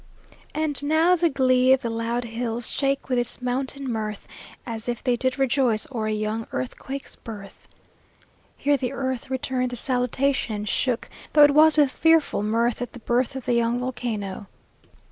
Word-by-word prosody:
"And 305 Hz, -2 st, +1 dB
now, 320 Hz, +4 st, +4 dB
the 345 Hz, -1 st, +2 dB
glee 260 Hz, -2 st, +4 dB
Of 265 Hz, +1 st, +1 dB
the 235 Hz, -, -2 dB
loud 230 Hz, +2 st, -1 dB
hills 235 Hz, 0 st, -3 dB
shakes 275 Hz, 0 st, -1 dB
with 255 Hz, -2 st, +1 dB
its 240 Hz, -, -3 dB
mountain 260 Hz, +2 st, -2 dB
mirth, 215 Hz, -3 st, -4 dB, 0.4 s
As 230 Hz, 0 st, -5 dB
if 240 Hz, -, -3 dB
they 250 Hz, -2 st, +2 dB
did 260 Hz, +2 st, -1 dB
rejoice 260 Hz, -5 st, +2 dB
o'er 225 Hz, -4 st, -2 dB
a -, -, 0 dB
young 215 Hz, +1 st, -2 dB
earthquake's 265 Hz, -, -5 dB
birth." 205 Hz, -3 st, -10 dB, 0.9 s
Here 285 Hz, 0 st, +2 dB
the 250 Hz, -2 st, -3 dB
earth 260 Hz, -2 st, -3 dB
returned 255 Hz, -1 st, -1 dB
the 245 Hz, -, -5 dB
salutation, 250 Hz, 0 st, 0 dB
and 210 Hz, 0 st, -5 dB
shook, 250 Hz, +2 st, 0 dB, 0.3 s
though 295 Hz, -, +8 dB
it 290 Hz, -, +7 dB
was 310 Hz, +1 st, +6 dB
with 290 Hz, -3 st, +5 dB
fearful 325 Hz, -8 st, +3 dB
mirth, 230 Hz, +3 st, 0 dB
at 245 Hz, -, -5 dB
the 245 Hz, -, -9 dB
birth 245 Hz, +3 st, 0 dB
of 265 Hz, -, -6 dB
the 245 Hz, -, +1 dB
young 235 Hz, 0 st, +2 dB
volcano. 225 Hz, -6 st, -4 dB
250 Hz, 175 wpm, -24 LUFS, 230-270 Hz, 0.9 s, though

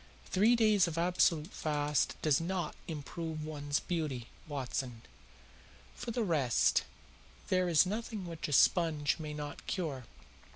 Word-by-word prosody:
"Three 215 Hz, +6 st, +4 dB
days 215 Hz, -5 st, +4 dB
of 165 Hz, -1 st, -4 dB
absolute 170 Hz, -1 st, +2 dB
fast 150 Hz, -2 st, 0 dB
does 155 Hz, 0 st, +3 dB
not 175 Hz, -2 st, -2 dB
improve 160 Hz, 0 st, -5 dB
one's 145 Hz, -2 st, -2 dB
beauty, 150 Hz, -9 st, -3 dB, 0.2 s
Watson. 130 Hz, -4 st, -4 dB, 0.9 s
For 70 Hz, -, -7 dB
the 235 Hz, 0 st, 0 dB
rest, 150 Hz, -, +2 dB, 0.6 s
there 185 Hz, -1 st, +2 dB
is 165 Hz, +1 st, +5 dB
nothing 215 Hz, 0 st, -4 dB
which 165 Hz, -2 st, -5 dB
a -, -, -5 dB
sponge 155 Hz, -2 st, +3 dB
may 150 Hz, -1 st, -5 dB
not 145 Hz, -1 st, -6 dB
cure. 145 Hz, -9 st, -3 dB
160 Hz, 130 wpm, -33 LUFS, 145-180 Hz, 0.9 s, is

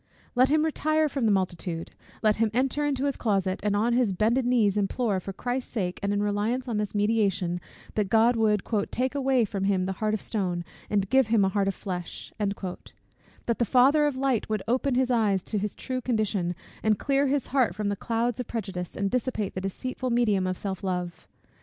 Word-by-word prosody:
Let 255 Hz, +1 st, +4 dB
him 310 Hz, +1 st, +3 dB
retire 310 Hz, 0 st, +1 dB
from 270 Hz, -5 st, 0 dB
the -, -, +4 dB
multitude 175 Hz, -3 st, -2 dB, 0.3 s
Let 215 Hz, -1 st, +3 dB
him 225 Hz, 0 st, +2 dB
enter 270 Hz, +3 st, +1 dB
into 280 Hz, -2 st, 0 dB
his 280 Hz, -2 st, 0 dB
closet, 195 Hz, -4 st, 0 dB
and 205 Hz, 0 st, +1 dB
on 225 Hz, +4 st, +2 dB
his 240 Hz, -5 st, +2 dB
bended 235 Hz, +6 st, +2 dB
knees 225 Hz, -5 st, +3 dB
implore, 205 Hz, 0 st, 0 dB
for 195 Hz, -, -6 dB
Christ's 245 Hz, +6 st, -3 dB
sake 185 Hz, -6 st, -2 dB
and 200 Hz, -, 0 dB
in 205 Hz, 0 st, +1 dB
reliance 215 Hz, +5 st, -1 dB
on 225 Hz, -3 st, -1 dB
his 210 Hz, 0 st, -3 dB
mediation, 200 Hz, -5 st, +1 dB, 0.3 s
that 210 Hz, -3 st, 0 dB
God 230 Hz, +3 st, +4 dB
would 215 Hz, -3 st, +2 dB, 0.3 s
"take 255 Hz, +2 st, -1 dB
away 265 Hz, -4 st, +2 dB
from 195 Hz, -2 st, -3 dB
him 190 Hz, -2 st, +2 dB
the 190 Hz, -, -1 dB
heart 215 Hz, 0 st, +1 dB
of -, -, -3 dB
stone, 180 Hz, -5 st, -2 dB, 0.2 s
and 200 Hz, -2 st, +1 dB
give 265 Hz, +1 st, +4 dB
him 220 Hz, -3 st, +3 dB
a -, -, +2 dB
heart 195 Hz, 0 st, 0 dB
of 195 Hz, -, 0 dB
flesh;" 180 Hz, -3 st, -6 dB
that 200 Hz, +3 st, -5 dB
the -, -, +4 dB
Father 270 Hz, +5 st, +4 dB
of 280 Hz, -3 st, -2 dB
light 260 Hz, -5 st, 0 dB
would 215 Hz, -2 st, -1 dB
open 255 Hz, +2 st, +1 dB
his 255 Hz, 0 st, +2 dB
eyes 205 Hz, -6 st, +2 dB
to 210 Hz, -, -2 dB
his 210 Hz, 0 st, -3 dB
true 255 Hz, -1 st, -4 dB
condition, 210 Hz, -7 st, 0 dB, 0.3 s
and 215 Hz, -1 st, +2 dB
clear 275 Hz, +3 st, +1 dB
his 275 Hz, -1 st, 0 dB
heart 255 Hz, -8 st, +3 dB
from 210 Hz, 0 st, -1 dB
the 200 Hz, -, 0 dB
clouds 230 Hz, +3 st, -1 dB
of 250 Hz, -, -3 dB
prejudice, 190 Hz, -6 st, -5 dB
and 200 Hz, 0 st, 0 dB
dissipate 245 Hz, -5 st, -1 dB
the 185 Hz, -, -4 dB
deceitful 255 Hz, +6 st, -4 dB
medium 215 Hz, -6 st, +2 dB
of 185 Hz, 0 st, -2 dB
self 195 Hz, -2 st, -4 dB
love. 180 Hz, -2 st, -3 dB
215 Hz, 210 wpm, -27 LUFS, 195-250 Hz, 0.3 s, Let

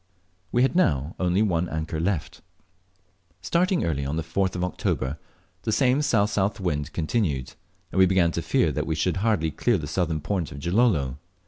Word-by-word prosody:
We 120 Hz, -, +3 dB
had 135 Hz, -, +1 dB
now 75 Hz, -, +2 dB
only 90 Hz, +3 st, +2 dB
one 90 Hz, -4 st, 0 dB
anchor 80 Hz, 0 st, -3 dB
left. 85 Hz, -1 st, -2 dB, 1.0 s
Starting 175 Hz, -, +1 dB
early, 70 Hz, -4 st, -1 dB
on 70 Hz, +2 st, -2 dB
the 80 Hz, -, -1 dB
4th 95 Hz, +4 st, -1 dB
of 90 Hz, -, -2 dB
October, 75 Hz, -5 st, -2 dB, 0.4 s
the -, -, -2 dB
same 130 Hz, +3 st, +3 dB
S.S.W 105 Hz, -7 st, +1 dB
wind 75 Hz, -2 st, -1 dB
continued, 80 Hz, -, -1 dB, 0.4 s
and 95 Hz, -, -1 dB
we 95 Hz, -, +7 dB
began 90 Hz, -3 st, +3 dB
to -, -, -2 dB
fear -, -, +2 dB
that -, -, -2 dB
we 80 Hz, -, 0 dB
should 90 Hz, +4 st, 0 dB
hardly 95 Hz, -6 st, +1 dB
clear 120 Hz, +5 st, +1 dB
the 80 Hz, -, -5 dB
southern 80 Hz, 0 st, -1 dB
point 85 Hz, 0 st, -2 dB
of 75 Hz, -, -8 dB
Gilolo. 85 Hz, -, +1 dB
90 Hz, 180 wpm, -25 LUFS, 80-105 Hz, 1.0 s, we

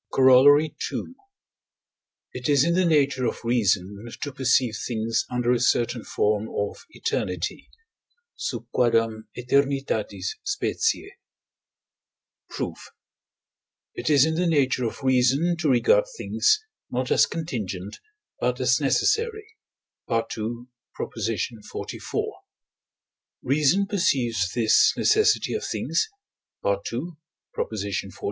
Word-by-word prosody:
Corollary 145 Hz, +4 st, +6 dB, 0.2 s
II. -, -, -2 dB, 1.3 s
It 125 Hz, +2 st, -4 dB
is 140 Hz, -2 st, +5 dB
in 170 Hz, -, +2 dB
the 185 Hz, +1 st, +2 dB
nature 140 Hz, -5 st, +2 dB
of -, -, -4 dB
reason 105 Hz, -4 st, 0 dB, 0.2 s
to 145 Hz, -, -3 dB
perceive 125 Hz, -4 st, +2 dB
things 115 Hz, -1 st, -1 dB
under 125 Hz, -1 st, 0 dB
a 125 Hz, -, +2 dB
certain 120 Hz, -1 st, +1 dB
form 105 Hz, +1 st, 0 dB
of 100 Hz, 0 st, -3 dB
eternity -, -, -3 dB, 0.7 s
(sub -, -, -4 dB
quâdam 115 Hz, -2 st, +1 dB
æternitatis 125 Hz, -6 st, 0 dB, 0.2 s
specie). 405 Hz, 0 st, -1 dB, 1.4 s
Proof. -, -, -6 dB, 1.0 s
It -, -, -3 dB
is 145 Hz, -2 st, +6 dB
in 160 Hz, -, 0 dB
the 175 Hz, +2 st, 0 dB
nature 130 Hz, -5 st, +2 dB
of 115 Hz, -, -5 dB
reason 130 Hz, +6 st, +3 dB
to 160 Hz, -4 st, +1 dB
regard 485 Hz, -, +4 dB
things, 430 Hz, 0 st, +2 dB, 0.3 s
not 125 Hz, +1 st, -2 dB
as 110 Hz, -3 st, +5 dB
contingent, 105 Hz, -, -5 dB, 0.4 s
but -, -, 0 dB
as -, -, +2 dB
necessary 445 Hz, -1 st, 0 dB, 0.5 s
(II. 115 Hz, +1 st, -2 dB, 0.3 s
xliv.). 115 Hz, 0 st, -4 dB, 1.1 s
Reason 150 Hz, +8 st, +2 dB
perceives 120 Hz, -, 0 dB
this 115 Hz, -3 st, +4 dB
necessity 435 Hz, 0 st, +3 dB
of 435 Hz, -, -3 dB
things 440 Hz, -, -1 dB, 0.6 s
(II. 115 Hz, -, -2 dB, 0.4 s
xli.) 100 Hz, -2 st, -3 dB
125 Hz, 105 wpm, -25 LUFS, 115-155 Hz, 1.4 s, Corollary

